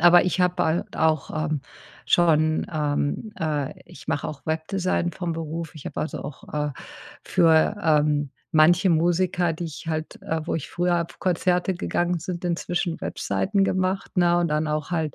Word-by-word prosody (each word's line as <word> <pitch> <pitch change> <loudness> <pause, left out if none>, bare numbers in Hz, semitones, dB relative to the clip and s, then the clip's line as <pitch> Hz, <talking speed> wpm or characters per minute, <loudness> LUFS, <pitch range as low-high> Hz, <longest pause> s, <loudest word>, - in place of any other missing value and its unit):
Aber 175 +1 +7
ich 185 +1 0
habe 180 0 +3
bald 170 -1 0
auch, 155 -3 +1
ähm, 155 -3 -1 0.5
schon, 155 -2 +3
ähm, 150 +6 -1
äh, 150 -5 -1
ich - - -14
mache 145 - -1
auch 140 -2 -8
Webdesign 175 +2 -1
vom 175 -3 -3
Beruf. 165 0 -5
Ich 150 - -11
habe - - -4
also 155 - -4
auch, 145 -1 -9
äh, 150 -1 -1 0.5
für, 165 +4 +4
ähm, 150 -2 +2 0.2
manche 175 +4 +5
Musiker, 175 +1 +2
die 165 +2 -5
ich 160 0 -8
halt, 155 -1 -3
äh, 160 0 -2
wo - - -1
ich 160 - -4
früher 175 -1 +1
pf - - -15
Konzerte 180 +1 +1
gegangen 175 0 0
sind, 175 +1 -5
inzwischen 175 0 -1
Webseiten 195 0 0
gemacht, 185 +1 -1
ne, 175 -1 +4
und 175 -1 +1
dann 150 +1 0
auch 150 +1 -2
halt, 160 -5 -1
165 Hz, 170 wpm, -24 LUFS, 155-175 Hz, 0.5 s, Aber